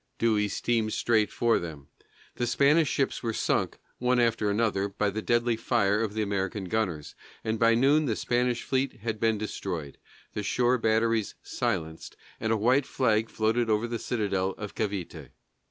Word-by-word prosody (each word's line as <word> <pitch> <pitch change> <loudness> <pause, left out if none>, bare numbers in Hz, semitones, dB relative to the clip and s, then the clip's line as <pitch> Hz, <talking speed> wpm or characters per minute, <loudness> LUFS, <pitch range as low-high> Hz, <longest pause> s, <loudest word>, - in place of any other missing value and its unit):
Dewey 110 -2 +2
steamed 110 +1 -1
straight 110 -3 +2
for 120 -1 +2
them; 75 -5 -8 0.5
the 120 - 0
Spanish 145 +6 +4
ships 135 - -1
were 115 -2 -2
sunk, - - 0 0.2
one 125 0 +2
after 115 -3 +2
another, 100 -2 +1
by 100 +1 -1
the 110 +2 -3
deadly 120 +1 +1
fire 110 -2 +1
of 110 -2 -2
the 110 - 0
American 100 0 -2
gunners, 90 -7 -2 0.3
and 110 0 -1
by 115 0 +5
noon 140 +5 +4
the 115 -5 0
Spanish 120 +1 0
fleet 130 -3 -1
had 110 -1 -3
been 115 -1 +2
destroyed, 90 -8 -5 0.3
the 105 - -3
shore 125 +4 +1
batteries 110 -1 +1
silenced, 80 0 -3 0.2
and 110 0 -1
a 115 - +3
white 125 +6 +2
flag 110 -4 +1
floated 115 +2 0
over 110 +2 +1
the 115 -1 -3
citadel 100 -5 -1
of 105 -2 -6
Cavité. 90 - -4
110 Hz, 170 wpm, -28 LUFS, 105-120 Hz, 0.5 s, by